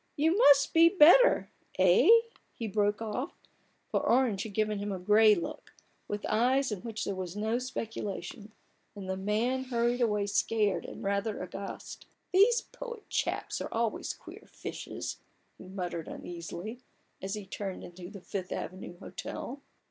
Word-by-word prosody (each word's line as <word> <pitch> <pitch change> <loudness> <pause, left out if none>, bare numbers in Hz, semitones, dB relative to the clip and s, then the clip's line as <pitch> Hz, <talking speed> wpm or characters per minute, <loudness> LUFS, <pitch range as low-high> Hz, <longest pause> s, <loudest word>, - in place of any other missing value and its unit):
You 320 +4 +2
must 285 - +6
be 330 +1 +7
much 390 - -13
better 360 +12 +7
— - - -24
eh? - - +5 0.3
" - - -31
he 230 - -3
broke 205 +1 0
off, 215 -2 -3 0.6
for - - +2
Orange 235 -5 +2
had 205 -2 -6
given 215 -1 0
him 205 0 -3
a 190 - -2
gray 210 +3 +5
look, 170 - -6 0.3
with 205 0 -4
eyes 255 +4 +2
in 205 - -3
which 225 -2 -4
there 200 - -2
was 185 -1 -5
no 220 +3 0
speculation; 220 -4 -5 0.4
and 195 -2 -7
the 190 - -1
man 220 +7 0
hurried 240 0 0
away 210 -3 +2
scared 205 0 +1
and - - -8
rather 200 +2 -1
aghast. 195 +2 -8 0.3
"These 425 +6 +5
poet 475 -3 -9
chaps - - -2
are - - -5
always 230 -1 -1
queer - - -13
fishes," - - -6 0.4
he - - -11
muttered 180 -3 -4
uneasily, 175 +6 -7 0.4
as 195 +2 -3
he 210 -2 -7
turned 195 0 -5
into 175 0 -9
the 200 -2 -10
Fifth 185 -1 -5
Avenue 185 -1 -6
Hotel. 270 +8 -7
210 Hz, 165 wpm, -30 LUFS, 195-245 Hz, 0.6 s, be